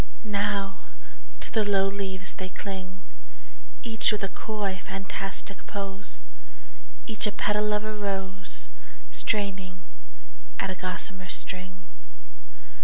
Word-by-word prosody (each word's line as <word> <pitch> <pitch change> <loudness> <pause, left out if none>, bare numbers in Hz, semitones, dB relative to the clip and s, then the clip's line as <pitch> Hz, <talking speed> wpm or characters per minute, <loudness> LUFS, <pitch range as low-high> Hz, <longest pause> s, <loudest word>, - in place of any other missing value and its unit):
Now 200 -1 +2 0.6
to - - -1
the 220 -2 +6
low 200 -1 +6
leaves 195 -1 0
they 185 -1 -3
cling, 190 -1 -4 0.8
Each 230 -1 +4
with 210 -2 +1
coy 200 -4 0
fantastic 195 +1 -3
pose, 200 0 -4 0.8
Each 215 -1 +2
a - - +3
petal 210 +1 +3
of 210 0 +3
a 215 - 0
rose 195 -2 -1 0.4
Straining 195 -3 +1 0.8
at 195 - +2
a - - +1
gossamer 185 0 -2
string. 185 0 -3
195 Hz, 110 wpm, -30 LUFS, 190-210 Hz, 0.8 s, the